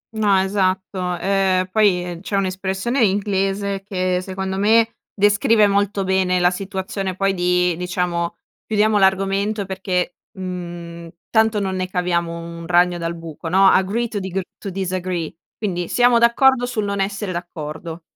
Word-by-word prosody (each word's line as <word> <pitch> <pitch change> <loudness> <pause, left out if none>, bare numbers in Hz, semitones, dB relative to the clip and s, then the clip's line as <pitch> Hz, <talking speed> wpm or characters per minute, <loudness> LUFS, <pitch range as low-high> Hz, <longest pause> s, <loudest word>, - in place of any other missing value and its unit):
No 205 -3 +3
esatto, 190 -2 -1
ehm, 190 -1 +1
poi 180 -5 +2
c'è 200 - -4
un'espressione 195 +6 0
inglese 195 -1 0
che 185 -2 -1
secondo 190 0 -4
me, 225 +2 +3
descrive 205 +2 +4
molto 200 0 +1
bene 190 -1 +1
la 175 0 +4
situazione 190 0 -4
poi 195 +1 +1
di 180 -1 +1
diciamo 175 -1 -2 0.3
chiudiamo 215 -1 +2
l'argomento 195 +2 +1
perché, 185 -2 -2 0.2
mhmm, 175 -2 -6 0.2
tanto 220 -1 +3
non 190 -1 -2
ne 185 0 -2
caviamo 170 -2 -1
un 170 0 -8
ragno 175 0 +3
dal 170 0 -3
buco 165 0 -7
no, 190 +2 +4
agree 205 +6 +2
to 210 -2 -4
digr 190 0 -3 0.2
to 200 - -5
disagree 185 -3 -3 0.2
quindi 180 -5 -2
siamo 245 -1 +4
d'accordo 245 +1 +4
sul 215 -4 -2
non 200 -1 -2
essere 195 0 -2
d'accordo. 165 -1 -6
190 Hz, 140 wpm, -20 LUFS, 180-200 Hz, 0.3 s, descrive